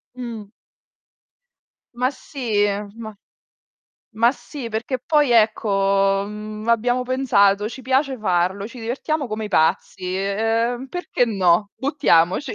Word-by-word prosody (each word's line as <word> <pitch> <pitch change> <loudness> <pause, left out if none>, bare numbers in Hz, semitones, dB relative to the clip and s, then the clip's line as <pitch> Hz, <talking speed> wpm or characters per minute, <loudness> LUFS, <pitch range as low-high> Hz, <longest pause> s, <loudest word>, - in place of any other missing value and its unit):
Mh. 230 -5 -7 1.4
Ma 250 +2 +1
sì, 235 -7 -1 0.3
ma 220 -2 -8 1.0
ma 230 +3 +3
sì, 270 -5 -8
perché 235 +4 -2
poi 295 +1 +2
ecco, 195 -3 +2
mhmm, 215 +1 -7
abbiamo 245 +2 +2
pensato: 210 -6 +2
"Ci 260 +2 -10
piace 265 +1 +1
farlo, 185 0 0
ci 235 +1 -11
divertiamo 275 +5 -2
come 215 0 -4
i 210 - -5
pazzi, 185 +2 0
ehm, 225 +6 -1
perché 355 -8 -1
no? 195 -1 +2
Buttiamoci." 265 - +2
225 Hz, 115 wpm, -21 LUFS, 200-255 Hz, 1.4 s, ma